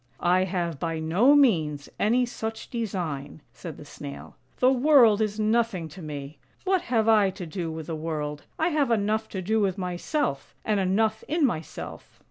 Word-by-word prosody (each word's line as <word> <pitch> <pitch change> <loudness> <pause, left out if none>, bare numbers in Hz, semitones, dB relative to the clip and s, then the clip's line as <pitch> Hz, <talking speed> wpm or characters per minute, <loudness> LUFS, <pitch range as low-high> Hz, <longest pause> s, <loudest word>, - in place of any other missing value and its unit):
" 120 - -36 0.2
I 185 - +2
have 170 -5 -2
by 165 0 -2
no 180 - +4
means 160 - +3
any 240 +4 +3
such 225 -2 -6
design," 170 - -4
said 165 -4 -8
the 150 - -11
Snail. 145 -1 -9
" - - -38
The 255 +1 +5
world 255 -5 +5
is 215 0 -1
nothing 215 -5 +1
to 180 +5 -11
me. 145 -2 -7 0.2
What 380 -1 +2
have 225 -6 0
I 210 -3 +5
to 190 -1 -7
do 165 0 -4
with 160 -1 -6
the 165 - -4
world? 150 -2 -4
I 320 +2 +2
have 300 -5 +1
enough 220 0 +1
to 190 -2 -5
do 220 +4 +1
with 195 -2 +1
myself, 180 - -2
and 210 -2 +1
enough 215 +4 +1
in 310 0 +2
myself." 165 - -5
195 Hz, 185 wpm, -26 LUFS, 160-225 Hz, 0.2 s, The